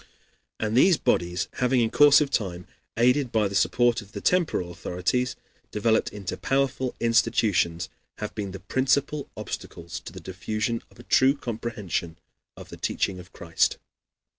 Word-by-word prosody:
And 110 Hz, 0 st, -1 dB
these 170 Hz, +6 st, +6 dB
bodies, 85 Hz, +1 st, 0 dB
having 125 Hz, 0 st, +3 dB
in 115 Hz, -2 st, +1 dB
course 145 Hz, 0 st, +7 dB
of 140 Hz, -2 st, 0 dB
time, 90 Hz, -7 st, -2 dB, 0.3 s
aided 125 Hz, +2 st, +3 dB
by 110 Hz, -2 st, +2 dB
the 100 Hz, -, -7 dB
support 120 Hz, +3 st, +2 dB
of 105 Hz, +1 st, -16 dB
the -, -, -4 dB
temporal 165 Hz, -, +1 dB
authorities, 90 Hz, +9 st, -1 dB, 0.3 s
developed 110 Hz, +1 st, +1 dB
into 100 Hz, -3 st, -5 dB
powerful 135 Hz, -1 st, 0 dB
institutions, 110 Hz, -7 st, +2 dB, 0.3 s
have 105 Hz, -, -5 dB
been 100 Hz, -2 st, -4 dB
the 95 Hz, +1 st, -7 dB
principal 140 Hz, +6 st, 0 dB
obstacles 85 Hz, 0 st, -6 dB
to -, -, -10 dB
the 95 Hz, -, -9 dB
diffusion 110 Hz, +6 st, -3 dB
of -, -, -22 dB
a 120 Hz, -, -12 dB
true 135 Hz, +3 st, +4 dB
comprehension 110 Hz, -9 st, -4 dB, 0.4 s
of -, -, -11 dB
the -, -, -9 dB
teaching 95 Hz, -2 st, -1 dB
of 90 Hz, 0 st, -13 dB
Christ. 85 Hz, -1 st, 0 dB
110 Hz, 155 wpm, -26 LUFS, 95-125 Hz, 0.4 s, course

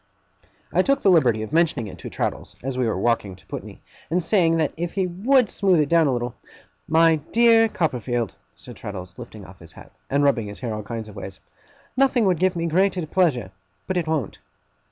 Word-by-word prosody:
I -, -, +4 dB
took 275 Hz, 0 st, +1 dB
the 195 Hz, -, +5 dB
liberty 120 Hz, -10 st, +3 dB
of 110 Hz, -, -8 dB
mentioning 160 Hz, -7 st, +2 dB
it 100 Hz, -, -10 dB
to -, -, -7 dB
Traddles, -, -, -4 dB
as 135 Hz, 0 st, -3 dB
we 125 Hz, -2 st, 0 dB
were 110 Hz, -, -1 dB
walking 105 Hz, -2 st, 0 dB
to 95 Hz, -, -21 dB
Putney; -, -, -8 dB, 0.3 s
and 175 Hz, +2 st, 0 dB
saying 165 Hz, -3 st, +3 dB
that 155 Hz, -3 st, 0 dB
if 175 Hz, +1 st, -4 dB
he 195 Hz, -2 st, 0 dB
WOULD 225 Hz, +8 st, +2 dB
smooth 190 Hz, -4 st, +2 dB
it 150 Hz, -2 st, +1 dB
down 165 Hz, -2 st, +4 dB
a -, -, +2 dB
little 120 Hz, -1 st, -2 dB, 0.5 s
'My 165 Hz, 0 st, +4 dB
dear 230 Hz, -1 st, +5 dB
Copperfield,' 125 Hz, -, -1 dB, 0.2 s
said -, -, -12 dB
Traddles, 90 Hz, -2 st, -8 dB
lifting 110 Hz, -4 st, -10 dB
off 95 Hz, 0 st, -15 dB
his 80 Hz, -1 st, -14 dB
hat, -, -, -14 dB, 0.2 s
and 140 Hz, +1 st, +2 dB
rubbing 125 Hz, -7 st, +2 dB
his 100 Hz, -, -9 dB
hair 120 Hz, -3 st, -3 dB
all 105 Hz, -, -4 dB
kinds 110 Hz, +1 st, -6 dB
of 105 Hz, -, -12 dB
ways, 95 Hz, -1 st, -8 dB, 0.6 s
'nothing 260 Hz, -3 st, +3 dB
would 180 Hz, -4 st, +2 dB
give 185 Hz, 0 st, +2 dB
me 170 Hz, 0 st, -2 dB
greater 180 Hz, +1 st, +1 dB
pleasure. 150 Hz, -, +1 dB, 0.3 s
But 185 Hz, -, -3 dB
it 175 Hz, -3 st, -1 dB
won't. 155 Hz, -10 st, -2 dB
155 Hz, 210 wpm, -23 LUFS, 115-180 Hz, 0.6 s, the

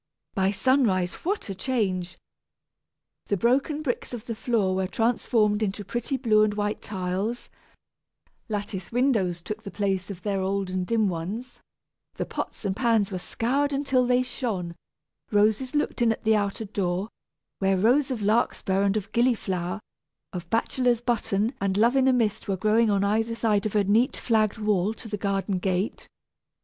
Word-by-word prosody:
By 190 Hz, -1 st, +2 dB
sunrise 205 Hz, -5 st, +2 dB
what 400 Hz, +5 st, -1 dB
a 195 Hz, -, -3 dB
change! 190 Hz, -5 st, -1 dB, 1.1 s
The 200 Hz, -, +1 dB
broken 275 Hz, -, +1 dB
bricks 250 Hz, -2 st, -3 dB
of 235 Hz, -1 st, -9 dB
the 230 Hz, -, -3 dB
floor 215 Hz, -4 st, 0 dB
were 190 Hz, 0 st, 0 dB
transformed 225 Hz, -2 st, +1 dB
into 205 Hz, -1 st, -2 dB
pretty 240 Hz, +6 st, -2 dB
blue 220 Hz, -4 st, +3 dB
and 210 Hz, -1 st, +2 dB
white 210 Hz, 0 st, -2 dB
tiles, 195 Hz, +4 st, -3 dB, 1.0 s
lattice 205 Hz, -3 st, -4 dB
windows 220 Hz, -9 st, +1 dB
took 215 Hz, +3 st, -5 dB
the 210 Hz, -, -7 dB
place 195 Hz, -2 st, -1 dB
of 185 Hz, -3 st, -8 dB
their 200 Hz, -2 st, -1 dB
old 195 Hz, 0 st, -1 dB
and 185 Hz, -1 st, -2 dB
dim 225 Hz, -2 st, +2 dB
ones, 195 Hz, +9 st, -5 dB, 0.6 s
the -, -, -2 dB
pots -, -, -5 dB
and 190 Hz, -1 st, 0 dB
pans 225 Hz, -4 st, +2 dB
were 185 Hz, -, -3 dB
scoured 275 Hz, +9 st, 0 dB
until 270 Hz, -3 st, +2 dB
they 250 Hz, 0 st, +3 dB
shone, 215 Hz, -9 st, -3 dB, 0.6 s
roses 215 Hz, +6 st, +2 dB
looked 295 Hz, -3 st, 0 dB
in 235 Hz, -1 st, +4 dB
at 225 Hz, -, -4 dB
the 220 Hz, 0 st, +4 dB
outer 205 Hz, +1 st, -1 dB
door, 190 Hz, -1 st, -1 dB, 0.5 s
where 195 Hz, 0 st, +2 dB
rows 250 Hz, +9 st, +3 dB
of 240 Hz, -5 st, -3 dB
larkspur 200 Hz, -2 st, +1 dB
and 200 Hz, +1 st, +2 dB
of 200 Hz, 0 st, -5 dB
gillyflower, 205 Hz, -6 st, 0 dB, 0.5 s
of 175 Hz, -2 st, -6 dB
bachelor's 240 Hz, +2 st, +1 dB
button 230 Hz, -2 st, 0 dB
and 195 Hz, -1 st, 0 dB
"Love 235 Hz, +5 st, +4 dB
in 265 Hz, -1 st, +4 dB
a 260 Hz, -, +5 dB
mist" 220 Hz, -3 st, 0 dB
were 195 Hz, -1 st, 0 dB
growing 215 Hz, +3 st, +3 dB
on 200 Hz, -1 st, +2 dB
either 220 Hz, +3 st, +1 dB
side 215 Hz, -3 st, +1 dB
of 215 Hz, -, -7 dB
a 205 Hz, -, +4 dB
neat 220 Hz, +6 st, +2 dB
flagged 220 Hz, -2 st, +1 dB
walk 210 Hz, -1 st, +1 dB
to 225 Hz, -, -10 dB
the 210 Hz, -, -3 dB
garden 195 Hz, -1 st, -1 dB
gate. 185 Hz, +3 st, -1 dB
215 Hz, 170 wpm, -26 LUFS, 195-235 Hz, 1.1 s, a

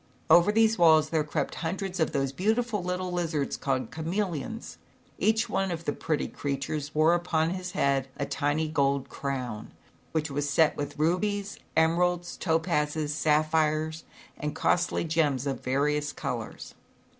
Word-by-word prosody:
Over 175 Hz, +4 st, +7 dB
these 225 Hz, -1 st, +3 dB
walls 155 Hz, -2 st, +5 dB
there 160 Hz, -2 st, +2 dB
crept 150 Hz, -, -2 dB
hundreds 185 Hz, +2 st, -3 dB
of 160 Hz, -, +2 dB
those 135 Hz, -3 st, 0 dB
beautiful 220 Hz, -, 0 dB
little 180 Hz, 0 st, -2 dB
lizards 165 Hz, -5 st, -1 dB
called 130 Hz, -4 st, -2 dB
chameleons. 180 Hz, -, -3 dB, 0.4 s
Each 220 Hz, +1 st, +2 dB
one 195 Hz, 0 st, 0 dB
of 170 Hz, -1 st, -4 dB
the 145 Hz, -, 0 dB
pretty 155 Hz, -2 st, -1 dB
creatures 145 Hz, +2 st, -4 dB
wore 155 Hz, +2 st, +5 dB
upon 170 Hz, -2 st, +1 dB
his 185 Hz, 0 st, -5 dB
head 135 Hz, -1 st, +1 dB
a 140 Hz, -, -1 dB
tiny 145 Hz, +2 st, 0 dB
gold 140 Hz, -3 st, 0 dB
crown, 125 Hz, -6 st, -4 dB, 0.4 s
which 155 Hz, -2 st, -1 dB
was 145 Hz, +1 st, -1 dB
set 150 Hz, +3 st, +3 dB
with 145 Hz, 0 st, -5 dB
rubies, 200 Hz, +6 st, 0 dB, 0.2 s
emeralds, 175 Hz, +2 st, +2 dB
topazes, 155 Hz, -2 st, 0 dB
sapphires 155 Hz, +1 st, +1 dB, 0.4 s
and 150 Hz, 0 st, -3 dB
costly 180 Hz, 0 st, +1 dB
gems 155 Hz, -5 st, +1 dB
of 135 Hz, -1 st, -3 dB
various 145 Hz, +2 st, 0 dB
colors. -, -, -5 dB
160 Hz, 145 wpm, -28 LUFS, 145-180 Hz, 0.4 s, Over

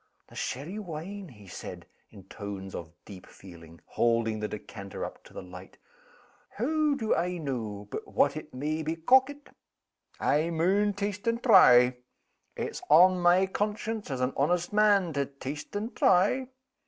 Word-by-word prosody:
"The -, -, -17 dB
sherry 155 Hz, +11 st, -4 dB
wine?" 190 Hz, +2 st, -7 dB
he 105 Hz, -6 st, -15 dB
said, 90 Hz, -, -9 dB, 0.2 s
in 95 Hz, -, -14 dB
tones 95 Hz, -1 st, -8 dB
of 80 Hz, -2 st, -7 dB
deep 95 Hz, -3 st, -12 dB
feeling, 85 Hz, -3 st, -14 dB
holding 115 Hz, -2 st, 0 dB
the 105 Hz, -, -2 dB
decanter 100 Hz, -2 st, -7 dB
up -, -, -10 dB
to -, -, -16 dB
the -, -, -8 dB
light. 90 Hz, +1 st, -12 dB, 0.8 s
"Hoo 300 Hz, +4 st, +1 dB
do 220 Hz, -4 st, 0 dB
I 180 Hz, +1 st, -1 dB
know 110 Hz, -9 st, -5 dB
but -, -, -6 dB
what 140 Hz, 0 st, +2 dB
it 155 Hz, 0 st, -8 dB
may 150 Hz, +5 st, -3 dB
be 160 Hz, +1 st, -2 dB
corkit? 260 Hz, -, +2 dB, 0.7 s
I 155 Hz, +3 st, +1 dB
maun 190 Hz, +5 st, +1 dB
taste 200 Hz, +1 st, -4 dB
and 230 Hz, +1 st, 0 dB
try. 125 Hz, -, +7 dB, 0.6 s
It's -, -, -4 dB
on 180 Hz, +4 st, +6 dB
my 175 Hz, +2 st, +4 dB
conscience, 210 Hz, +2 st, -3 dB
as 130 Hz, -2 st, -3 dB
an 125 Hz, +1 st, 0 dB
honest 175 Hz, +6 st, 0 dB
man, 205 Hz, -5 st, +3 dB
to 140 Hz, -1 st, -1 dB
taste 140 Hz, +5 st, -8 dB
and 215 Hz, +4 st, -4 dB
try." 205 Hz, +9 st, +3 dB
160 Hz, 155 wpm, -28 LUFS, -, 0.8 s, try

